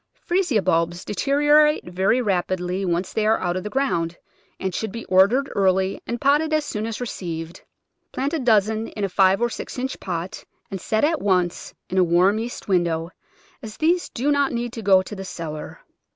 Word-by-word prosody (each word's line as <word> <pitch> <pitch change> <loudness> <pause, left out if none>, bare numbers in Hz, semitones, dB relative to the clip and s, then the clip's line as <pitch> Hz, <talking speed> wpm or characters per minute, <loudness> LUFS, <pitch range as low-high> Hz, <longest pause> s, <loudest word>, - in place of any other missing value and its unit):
Freesia 345 - +1
bulbs 170 0 0
deteriorate 295 +6 +3
very 190 +8 +1
rapidly 185 -1 -1
once 175 +1 -1
they 220 - 0
are 220 - +4
out 175 -1 -1
of 185 - -3
the 210 - -4
ground, 175 -10 -1 0.4
and 190 -1 -2
should 220 +2 -3
be 230 +2 -7
ordered 205 +9 +3
early 190 -1 +1
and 235 0 -3
potted 295 +3 +2
as 310 -1 +1
soon 215 -5 -3
as 225 - -5
received. 170 -8 -5 0.5
Plant 275 +4 -2
a 325 - 0
dozen 220 -2 +2
in 210 - -6
a 195 - 0
Ave 195 +3 +5
or 240 - +2
six - - -7
inch 260 +1 -3
pot, 175 -1 -5 0.3
and 190 -2 -5
set 220 +2 0
at 315 +1 +2
once 180 -3 0
in 185 - 0
a - - +6
warm 180 +5 +3
east 235 +2 -6
window, 170 -3 0 0.5
as 220 -3 -9
these 340 +3 +1
do 270 +5 -1
not 285 -1 +2
need 240 0 -3
to 230 - -6
go 190 -2 +5
to 210 - -8
the 195 - -6
cellar. 160 -5 -7
205 Hz, 195 wpm, -23 LUFS, 180-250 Hz, 0.5 s, a